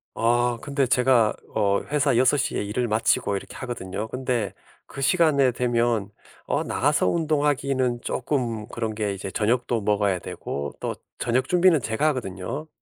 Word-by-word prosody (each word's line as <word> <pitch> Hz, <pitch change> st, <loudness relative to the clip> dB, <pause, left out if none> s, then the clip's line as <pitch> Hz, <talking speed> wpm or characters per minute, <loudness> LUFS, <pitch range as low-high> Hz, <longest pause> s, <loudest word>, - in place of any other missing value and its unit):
아 120 Hz, +1 st, +2 dB
근데 140 Hz, -2 st, 0 dB
제가 125 Hz, -3 st, +4 dB, 0.2 s
어 100 Hz, -2 st, +2 dB
회사 140 Hz, -3 st, +1 dB
6:00에 130 Hz, +2 st, +2 dB
일을 115 Hz, +4 st, -2 dB
마치고 105 Hz, -2 st, +1 dB
이렇게 -, -, -9 dB
하거든요. 110 Hz, -4 st, -5 dB
근데 125 Hz, -6 st, -2 dB, 0.3 s
그 -, -, -10 dB
시간이 140 Hz, -3 st, +3 dB
되면 120 Hz, -4 st, +1 dB, 0.4 s
어 -, -, 0 dB
나가서 -, -, +1 dB
운동하기는 140 Hz, -, +1 dB
쪼끔 120 Hz, -6 st, -2 dB
그런 115 Hz, -2 st, -3 dB
게 105 Hz, -2 st, -2 dB
이제 95 Hz, 0 st, -6 dB
저녁도 120 Hz, +3 st, +1 dB
먹어야 100 Hz, -2 st, +1 dB
되고 70 Hz, -4 st, -5 dB
또 -, -, -2 dB, 0.2 s
저녁 125 Hz, +2 st, 0 dB
준비는 180 Hz, -1 st, +4 dB
제가 110 Hz, +7 st, 0 dB
하거든요. 130 Hz, +2 st, -3 dB
120 Hz, 305 characters per minute, -24 LUFS, 105-135 Hz, 0.4 s, 제가